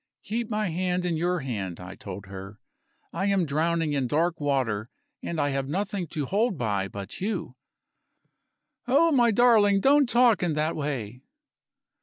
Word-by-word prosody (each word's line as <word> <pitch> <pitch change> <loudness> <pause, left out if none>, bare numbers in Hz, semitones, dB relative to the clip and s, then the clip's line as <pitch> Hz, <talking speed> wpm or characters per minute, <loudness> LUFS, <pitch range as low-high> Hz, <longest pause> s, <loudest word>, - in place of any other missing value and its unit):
"Keep 225 +2 -3
my 210 -3 -1
hand 180 +1 -1
in 175 -2 0
your 175 +1 0
hand," 100 -9 -4
I 90 +1 -8
told 100 0 -8
her; 95 +1 -9 0.5
"I 190 +4 -1
am 195 -3 +2
drowning 160 +1 0
in 135 -3 0
dark 165 +5 0
water 130 -7 -1 0.3
and 170 - -4
I 145 -1 +1
have 135 -1 -2
nothing 190 +1 -2
to 150 -1 -3
hold 200 - 0
by 100 -5 -1
but 100 - -8
you." 190 - -3 1.3
"Oh, 305 +6 +4
my 245 -5 +4
darling, 215 -3 +5
don't 280 +3 +4
talk 240 -3 +4
in 175 -3 +1
that 155 +2 0
way!" 130 -6 -4
165 Hz, 160 wpm, -26 LUFS, 130-200 Hz, 1.3 s, darling